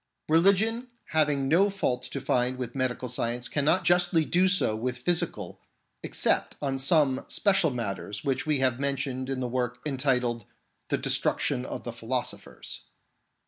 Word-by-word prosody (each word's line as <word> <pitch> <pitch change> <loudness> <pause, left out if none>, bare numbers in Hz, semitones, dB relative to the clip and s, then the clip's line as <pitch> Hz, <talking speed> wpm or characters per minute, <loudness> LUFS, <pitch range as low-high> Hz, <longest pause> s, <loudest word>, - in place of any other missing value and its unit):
Religion 200 +9 +3 0.2
having 150 -3 +1
no 180 +8 +4
fault 190 -11 -1
to 140 - -5
find 125 -1 0
with 125 -2 -5
medical 130 -1 -2
science 120 0 -2
cannot 155 +5 +2
justly 175 -2 +3
do 180 +4 +3
so 185 - +2
with 125 +3 -3
physical, 170 +7 -1 0.4
except - - 0
on 135 -2 -2
some 135 -2 +3
special 195 -5 +2
matters 105 -4 -4
which 135 -2 0
we 155 -2 +1
have 130 -2 +1
mentioned 135 -2 -2
in 135 -1 -2
the 125 - -1
work 125 0 -2
entitled 125 -5 0 0.4
The - - +1
Destruction 60 - 0
of - - -6
the - - -5
Philosophers. - - -5
135 Hz, 145 wpm, -27 LUFS, 125-160 Hz, 0.4 s, no